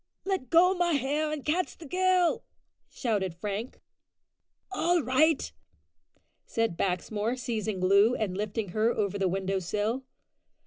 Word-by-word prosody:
"Let 380 -10 -2
go 355 +3 +5
my 350 -2 +1
hair, 295 +2 0
and 300 -3 -5
catch 340 +4 -1
the 330 - -11
girl!" 365 +2 +2 0.5
shouted 200 -8 -2
Frank. 205 +6 -5 0.9
"All 345 -2 +1
right," 270 +5 +2 0.9
said 230 -6 -1
Baxmore, 205 +6 -1
seizing 220 -5 -3
Loo 200 +6 +5
and 200 -4 -2
lifting 210 0 -3
her 215 +5 +1
over 200 -3 -1
the 195 - +2
window 190 +1 -1
sill. 210 +8 -2
230 Hz, 130 wpm, -28 LUFS, 200-310 Hz, 0.9 s, go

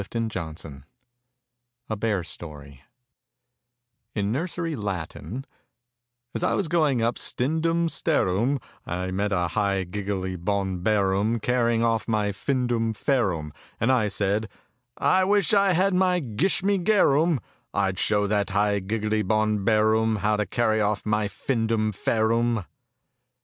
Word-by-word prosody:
A 100 - -9
BEAR 115 -1 -2
STORY 80 -5 -7 1.0
A 110 - -2
BEAR 105 -4 -1
STORY 75 -5 -10 1.3
IN 105 -1 0
NURSERY 165 +4 -2
LATIN 105 - -5 0.9
A - - -2
S - - -6
I - - +1
was 200 - 0
going 150 -7 +2
up 115 +1 0
stin 150 +6 0
dum 165 +1 +1
stair 160 - +1
um 115 +10 +1 0.2
I 90 +2 -3
met 100 +2 -1
a 90 -3 +1
high 100 -2 0
gig 100 +2 -6
gle 100 -2 -1
y 95 0 -3
bon 95 0 -1
bear 100 -1 +2
um 110 +4 +1
car 125 +2 +1
rying 115 -1 +2
off 115 -1 +1
my 105 -2 +1
fin 125 +5 -1
dum 115 -2 0
fair 120 -2 +1
um; 75 -3 -5 0.3
and 115 +4 +2
I 120 -5 +3
said, 105 +2 -1 0.5
"I 185 0 +3
wish 200 0 +2
I 200 -2 +4
had 190 +3 +2
my 180 -1 +3
gish 145 - 0
me 200 0 +2
gair 185 -6 +4
um 160 -1 +2 0.2
— - - -42
I'd 95 -2 0
show 105 -1 +2
that 100 0 0
high 100 +1 +1
gig 105 +3 -3
gle 105 - -1
y - - +1
bon 110 0 +1
bear 110 0 +3
um 110 0 +2
how 105 +1 +1
to 105 -1 -1
carry 110 +1 +1
off 105 0 0
my 105 -1 +1
fin 115 +3 -2
dum 110 -1 +1
fair 110 +2 0
um!" 115 -4 0
110 Hz, 175 wpm, -25 LUFS, 100-125 Hz, 1.3 s, I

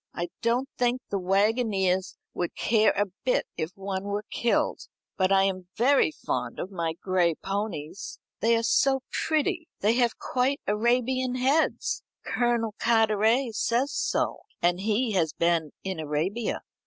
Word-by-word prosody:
I 175 0 -3
don't 240 +3 +1
think 245 +1 +2
the 200 - 0
waggoners 195 -1 +1 0.2
would 175 - -3
care 220 -1 +3
a 205 - +3 0.2
bit 255 - +1
if 160 - -2
one 195 0 -4
were 205 +1 -3
killed. 235 - 0 0.3
But 185 0 +1
I 195 0 +5
am 185 -2 -1
very 275 +7 +4
fond 310 - -4
of 190 - -5
my 170 -3 -2
gray 175 -1 +1
ponies. 195 -4 -4 0.2
They 230 +1 +3
are 230 - 0
so 270 +3 +3
pretty. 325 +2 0
They 210 +3 +3
have 240 -2 +2
quite 260 +2 0
Arabian 250 +4 +1
heads. 285 - +1 0.2
Colonel 235 -3 0
Carteret 225 +2 +3
says 240 +6 +1
so, - - 0 0.2
and 175 +1 +2
he 220 +4 0
has 170 -6 +1
been 170 -2 +1
in 190 -3 -3
Arabia." 160 +9 -2
215 Hz, 145 wpm, -27 LUFS, 190-245 Hz, 0.3 s, I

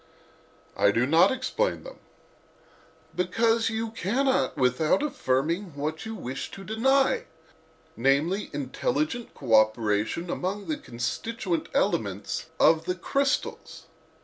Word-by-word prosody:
"I - - +4
do 115 +4 +2
not 160 +5 +5
explain 260 - -1
them." - - -11 1.2
"Because 225 +6 +2
you 225 0 -3
cannot 225 - 0
without 130 - +2
affirming 165 - -1
what 155 +7 -4
you 220 - -5
wish 130 - -5
to 195 - -8
deny, 270 - +2 0.7
namely, 145 - +1
intelligent 145 - -2
cooperation 110 - +2
among 200 +3 -3
the 310 - -1
constituent 170 - -3
elements - - -1
of 160 0 +4
the 180 - -1
crystals. 275 +9 -2
180 Hz, 105 wpm, -27 LUFS, -, 1.2 s, not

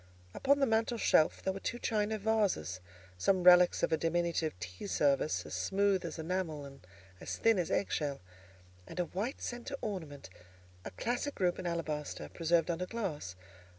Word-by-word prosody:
Upon 280 +1 +3
the 275 - +3
mantel 225 0 +1
shelf 155 -7 +3
there 190 - 0
were 195 - -6
two 240 - -3
china 215 -2 0
vases, 200 - 0 0.4
some 185 - +2
relics 180 0 +7
of - - +2
a 160 - +3
diminutive 165 - 0
tea 90 - -7
service, 145 -3 +1
as - - -8
smooth 195 -1 +1
as 170 -1 -5
enamel 160 -3 -3
and 135 0 -12 0.4
as - - -5
thin 225 -4 +3
as 175 - -1
egg 200 - 0
shell, 145 -3 -1 0.7
and - - -7
a 175 - +2
white 210 +10 -4
centre 245 +3 -4
ornament, 160 -9 -5 0.6
a - - -3
classic 245 - -2
group 180 -2 +1
in 185 - -3
alabaster, 155 -3 -3
preserved 170 +1 +1
under 180 +2 -3
glass. 160 - -4
180 Hz, 170 wpm, -33 LUFS, 155-210 Hz, 0.7 s, relics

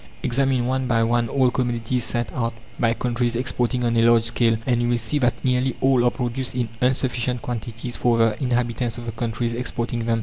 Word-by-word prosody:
Examine 130 0 +1
one 130 +1 0
by 115 -2 +2
one 120 0 +1
all 130 -1 +2
commodities 120 -1 -1
sent 120 -2 -2
out 115 -2 -2 0.2
by 115 -1 +3
countries 120 -1 -1
exporting 125 0 -1
on 120 -1 +1
a 115 - +4
large 115 0 +5
scale, 115 -1 +2
and 120 -2 +1
you 120 - +1
will 120 - +2
see 115 +6 -1
that 120 -2 0
nearly 125 0 +1
all 130 -2 +3
are 120 - +5
produced 125 +1 -3
in 120 -3 -1
insufficient 125 -1 0
quantities 120 0 -4
for 120 -1 +2
the 115 -2 +3
inhabitants 120 -2 0
of 120 - -7
the 115 - -3
countries 115 +1 -2
exporting 120 -1 -3
them. 115 -1 +2
120 Hz, 205 wpm, -23 LUFS, 115-125 Hz, 0.2 s, large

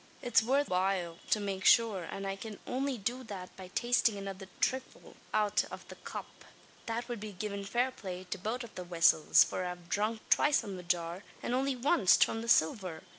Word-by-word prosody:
It's 240 -2 +4
worth 275 +6 +2
while 180 -2 0
to 215 - +3
make 195 -2 -3
shure, 215 -7 +4
an 195 +3 -6
I 195 0 -2
can 210 +1 -8
only 265 0 -1
do 245 +5 -3
that 190 -4 -8
by 190 -1 -9
tastin' 240 +1 +2
another 195 -1 -6
thrifle 260 0 -2 0.2
out 210 -1 +2
av - - -9
the - - -8
cup. - - -9 0.4
That 235 +1 -3
wud 240 -3 -4
be 210 0 -7
givin' 200 +1 -4
fair 245 +6 +1
play 185 -6 -7
to 200 - -2
both 225 +6 -3
av 235 - -11
the 180 - -6
vessels; 170 -3 +5
for - - -3
I've 180 -1 -6
dhrunk 215 +2 0
twice 295 -1 +5
from 200 -3 -6
the - - -7
jar, 175 +1 -2 0.2
an - - -1
only 265 +1 +1
wanst 255 - +5
from 225 - -4
the 230 - -5
silver. 170 -3 +2
205 Hz, 200 wpm, -32 LUFS, 185-240 Hz, 0.4 s, vessels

